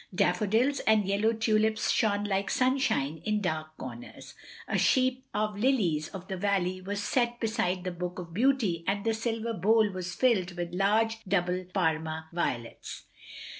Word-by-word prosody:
Daffodils 215 +8 +2
and 215 -2 +4
yellow 205 +3 +2
ttdips 220 -1 +1
shone 205 -2 +1
like 200 -1 -1
sunshine 255 - +1
in 210 -1 0
dark 155 -4 -3
comers; 120 -2 -9 0.3
a - - -2
sheaf 255 -1 +3
of 210 -1 -2
lilies 195 - +1
of 190 -1 -9
the 190 - -4
valley 185 -1 0
was 200 +2 -4
set 240 0 0
beside 215 -5 -1
the 185 - -3
Book 180 +1 -5
of 170 -2 -8
Beauty 220 -7 +1
and 200 +2 -1
the 225 - +2
silver 230 0 -2
bowl 220 0 +3
was 180 -1 -5
filled 200 -8 +2
with 175 0 -4
large, 220 +4 +2
double, 180 -1 0
Parma 160 -3 -1
violets. 120 -9 -4
200 Hz, 155 wpm, -29 LUFS, 180-225 Hz, 0.3 s, and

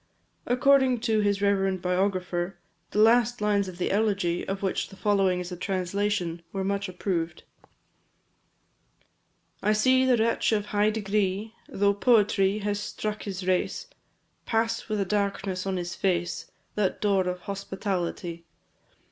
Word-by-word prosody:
According 260 -1 +4
to 220 -2 +2
his 205 -1 +1
reverend 195 -2 +2
biographer, 180 -1 -1 0.3
the - - -5
last 235 +2 +4
lines 205 -2 +1
of 180 -2 -8
the 180 - -1
elegy, 195 -4 +1
of 195 +1 -3
which 190 - -1
the - - -12
following 195 -3 +2
is 180 0 -6
a - - -4
translation, 185 -1 -1
were 195 -1 -2
much 200 0 -1
approved. 175 -2 -3 2.2
I 210 +1 +3
see 255 +5 +4
the 255 -2 +4
wretch 225 0 +1
of 205 -1 0
high 210 0 +2
degree, 210 0 -1 0.2
Though 200 0 +2
poverty 205 -3 +3
has 205 0 0
struck 210 0 -4
his 190 -2 -5
race, 185 - 0 0.6
Pass 225 0 0
with 215 -1 -1
a 195 - +1
darkness 195 -1 -1
on 190 -1 -1
his 175 -1 -4
face 175 -2 -1 0.2
That 205 -3 0
door 195 -3 +2
of 180 0 -3
hospitality. 185 -4 -4
200 Hz, 140 wpm, -27 LUFS, 185-210 Hz, 2.2 s, According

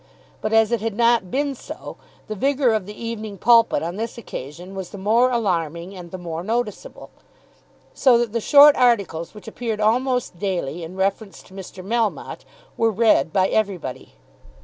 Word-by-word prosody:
But 215 - -2
as 225 0 +4
it 235 -3 0
had 225 -2 -3
not 235 -5 +3
been 280 +4 -1
so, 260 - -9 0.3
the 215 - -4
vigour 270 +3 +1
of 210 -4 -2
the 210 - -10
"Evening 220 -3 -6
Pulpit" 230 0 +4
on 170 +3 -4
this 230 +2 -4
occasion 175 - -8
was 190 -2 -6
the 205 - -9
more 225 +6 +3
alarming 180 -6 -2
and 175 -2 -10
the 185 - -7
more 170 -2 -6
noticeable, 225 +1 -4 0.8
so 255 -3 +4
that 235 -2 -1
the 230 - -1
short 290 +4 +7
articles 205 -9 +1
which 210 - -12
appeared 220 -1 -4
almost 245 -2 0
daily 175 -5 -3
in 165 +3 -8
reference 195 +2 -2
to - - -19
Mr. 190 -1 -10
Melmotte 225 0 -2 0.3
were 225 - +3
read 215 -8 +3
by 190 +1 +2
everybody. 190 -11 -3
215 Hz, 170 wpm, -22 LUFS, 185-235 Hz, 0.8 s, short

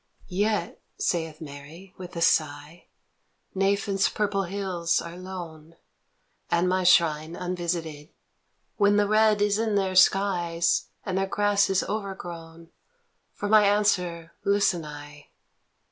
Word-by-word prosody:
" - - -24 0.2
Yet," 210 -5 -2 0.2
saith 160 -3 -2
Mary, 155 +5 -11
with 180 -1 -10
a 170 - -4
sigh, 150 +1 0 0.3
" - - -47
Nephin's 195 0 +1
purple 205 -2 -1
hills 180 -3 -1
are 170 0 -7
lone, 170 -4 -9 0.7
And 170 +2 +2
my 185 0 +1
shrine 165 -2 +3
unvisited. 170 -4 -4 0.7
When 205 -1 +4
the 205 0 +3
red 215 0 +3
is 205 0 +1
in 220 -2 0
their 190 -2 0
skies, 180 -3 +2 0.2
And 190 -1 -1
their 195 - 0
grass 205 0 +2
is 190 -1 +1
overgrown, 170 -5 -7 0.6
For 205 - -4
my 215 0 +6
answer 180 -5 +1
listen 200 -5 +1
I." 145 0 -11
180 Hz, 130 wpm, -26 LUFS, 165-200 Hz, 0.7 s, my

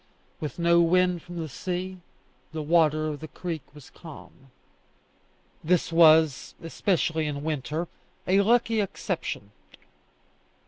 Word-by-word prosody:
With 150 -4 -5
no 170 0 +4
wind 180 0 +2
from 175 +1 -10
the 165 -1 -3
sea, 185 +5 -5 0.5
the 155 -1 -3
water 155 -1 +3
of 150 -2 -4
the 155 - -8
creek 165 -1 -5
was 145 -4 -14
calm. 145 -4 -13 1.1
This 170 0 +1
was, 160 -3 +5
especially 165 -2 0
in 145 -1 -4
winter, 155 +2 -3 0.4
a 195 +2 +4
lucky 225 +1 +2
exception. 105 - -4
165 Hz, 120 wpm, -26 LUFS, 155-180 Hz, 1.1 s, was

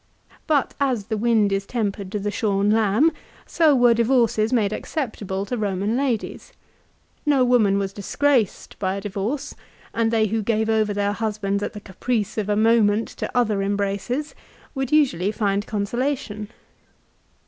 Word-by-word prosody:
But 295 -5 +1
as 260 -7 0
the 220 0 -2
wind 215 -2 +2
is 195 0 -1
tempered 200 -5 -3
to 210 - -2
the 205 0 -2
shorn 205 -1 +1
lamb, 220 +8 +3 0.3
so 315 -4 +3
were 245 -2 +5
divorces 230 -2 +2
made 215 -5 +1
acceptable 205 - -4
to 245 - -3
Eoman 205 0 -1
ladies. 255 -5 -2 0.7
No 280 -4 +3
woman 220 -5 +3
was 195 -1 -2
disgraced 235 +2 0
by 190 -1 -1
a 200 - -4
divorce, 205 +8 -3 0.4
and 230 -1 +1
they 225 -1 +2
who 220 +1 -1
gave 220 +1 0
over 215 -1 +2
their 205 0 0
husbands 205 -2 -2
at - - -3
the 210 - -7
caprice 210 +2 -3
of 210 -1 -3
a 205 - +2
moment 220 0 +3
to - - -5
other 215 -5 +2
embraces, 200 +8 -2 0.4
would 270 -2 -3
usually 250 - +2
find 205 -1 -1
consolation. 215 0 -2
215 Hz, 155 wpm, -23 LUFS, 200-240 Hz, 0.7 s, were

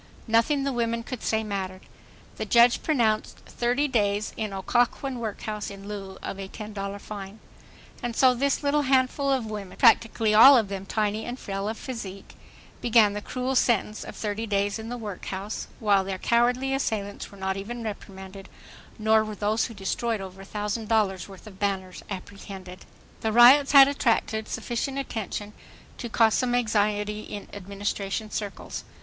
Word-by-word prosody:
Nothing 230 +6 +3
the 275 -1 -1
women 230 -1 -1
could 245 0 -6
say 220 0 0
mattered. 190 -3 -4 0.5
The - - -2
judge 240 0 +5
pronounced: 230 -8 +1
"Thirty 245 +5 0
days 210 -4 0
in 215 -2 -3
Occoquan 245 +6 0
workhouse 215 -1 -4
in 195 0 -10
lieu 195 -2 -7
of 195 - -5
a 195 - -5
$10.00 200 -1 -6
fine." 200 0 -8 0.6
And 240 -1 -3
so 255 0 +5
this 275 +4 0
little 290 +1 +2
handful 270 +1 +2
of 260 -4 +1
women, 210 -3 -7
practically 225 -3 +4
all 265 +6 +10
of 220 -4 +1
them 195 -1 -5
tiny 215 +1 -1
and 245 +1 -5
frail 195 -3 -4
of 220 - -4
physique, 200 -7 -7 0.5
began 225 -3 +5
the 210 - -4
cruel 255 +4 -3
sentence 225 -4 +1
of - - -9
30 215 +1 -3
days 200 +1 0
in 220 +1 -7
the 245 - -4
workhouse, 205 -1 -5
while 205 -3 +3
their 190 0 -4
cowardly 245 +5 +2
assailants 210 -7 -2
were 200 - -13
not 190 0 -2
even 230 +5 -5
reprimanded, 195 -2 -8 0.5
nor 220 0 +4
were 215 -1 -6
those 215 +3 +1
who 230 - -8
destroyed 215 +3 -2
over 190 0 -8
a - - -10
thousand 210 +2 -3
dollars' 205 -4 +1
worth 195 +1 -13
of 195 -3 -12
banners 190 -3 -2
apprehended. 190 -1 -8 0.3
The 220 - -1
riots 255 +5 +7
had 275 -1 +10
attracted 225 -5 0
sufficient 240 +4 -3
attention 215 -5 -4 0.5
to 235 - -5
cause 225 -1 +4
some 245 -1 +1
anxiety 210 -2 +1
in 205 -1 -8
Administration 200 +2 -4
circles. 205 -2 -5
215 Hz, 165 wpm, -26 LUFS, 200-240 Hz, 0.6 s, all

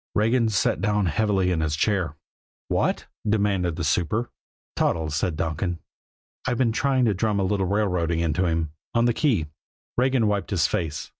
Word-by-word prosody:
Regan 115 +2 +3
sat 95 -5 +1
down 105 0 +1
heavily 95 +2 +1
in 85 -3 0
his 75 -1 0
chair. 90 -4 0 0.5
"What?" - - 0 0.2
demanded 100 -5 +1
the 85 - -3
super. 90 +9 0 0.4
"Toddles," 80 -2 0
said 85 +1 0
Donkin. 85 +2 -2 0.7
"I've 120 - 0
been 120 -2 +2
trying 130 +2 +2
to 110 - +3
drum 100 +1 0
a - - +1
little 95 0 0
railroading 90 -5 0
into 85 +2 +1
him 80 -2 -1 0.2
on 115 0 +4
the 120 - +3
key." 115 - +1 0.5
Regan 130 -2 +3
wiped 105 -1 0
his 85 -8 +2
face. 80 0 -2
95 Hz, 165 wpm, -24 LUFS, 85-110 Hz, 0.7 s, on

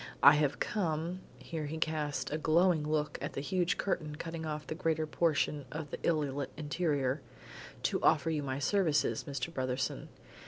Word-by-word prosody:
I 145 - +11
have 150 -2 +1
come 175 -2 -1
" - - -23
here 160 -3 -5
he 160 +2 -4
cast 155 -3 -1
a 155 - -1
glowing 160 0 +3
look 150 -1 0
at - - -3
the - - -3
huge 180 +3 +1
curtain 155 -6 -1
cutting 165 0 -5
off 150 -1 -4
the - - -4
greater 160 -1 0
portion 150 -2 +1
of 150 -1 -5
the - - -4
illy 150 -4 +1
lit 140 0 -3
interior 145 -3 0 0.6
"to - - +1
offer 160 +1 +4
you 155 -2 0
my 135 -2 -2
services, 160 0 +2
Mr. 145 +3 -4
Brotherson. 130 -2 -2
155 Hz, 180 wpm, -32 LUFS, 145-165 Hz, 0.6 s, I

